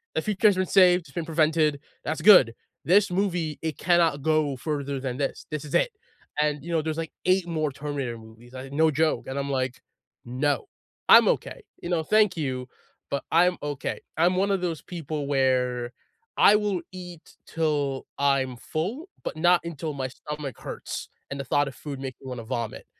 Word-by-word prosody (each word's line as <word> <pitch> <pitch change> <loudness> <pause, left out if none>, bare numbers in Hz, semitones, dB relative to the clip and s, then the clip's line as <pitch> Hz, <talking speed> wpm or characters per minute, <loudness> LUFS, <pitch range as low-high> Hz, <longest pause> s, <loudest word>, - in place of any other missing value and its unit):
The - - +1
future 215 0 +2
has 200 - +4
been 185 0 +1
saved. 180 -1 +5
It's 145 -4 -17
been 170 +1 -4
prevented. 155 -2 +2 0.2
That's 155 - -3
good. 180 - +8 0.3
This 195 +2 +4
movie, 175 -5 -1
it 160 -1 -3
cannot 165 -4 +3
go 155 -2 +1
further 140 0 -3
than 130 -1 -4
this. 140 - -3
This 155 -1 -4
is 150 - -4
it," - - +3 0.5
and, 150 -1 0
you 170 - -6
know, 160 -2 +2
there's 160 0 -3
like 165 -1 -4
8 185 -1 +3
more 155 -3 -1
Terminator 140 -4 -4
movies. 115 +3 -15
I 130 +1 -7
No 160 +3 +3
joke. 155 +2 +1
And 135 +1 -4
I'm 140 0 -2
like, 130 -2 -2 0.4
"No, 135 +3 -1 0.4
I'm - - +9
okay." - - -2 0.2
You 175 - -4
know, 170 -3 +1
"Thank 210 +2 +3
you, 130 -4 -3 0.4
but 140 - -1
I'm 180 +2 +4
okay." 145 -2 -3 0.2
I'm 175 +3 +3
one 200 +1 +2
of 195 - +1
those 170 -4 -2
people 155 -4 -5
where 125 -3 +1 0.5
I 205 - +7
will 205 -4 0
eat 180 -3 -10
till 145 -4 -1
I'm 135 -3 +1
full, 210 - -4
but - - -4
not 175 +2 +4
until 160 -2 -5
my 135 -2 -3
stomach 150 0 -7
hurts - - -6 0.2
and 140 - -4
the - - -2
thought 145 +3 +2
of 135 - -6
food 140 -3 -7
makes 130 -2 -6
me 135 - -10
wanna 125 -2 -5
vomit. 115 -1 -4
150 Hz, 190 wpm, -26 LUFS, 135-175 Hz, 0.5 s, I'm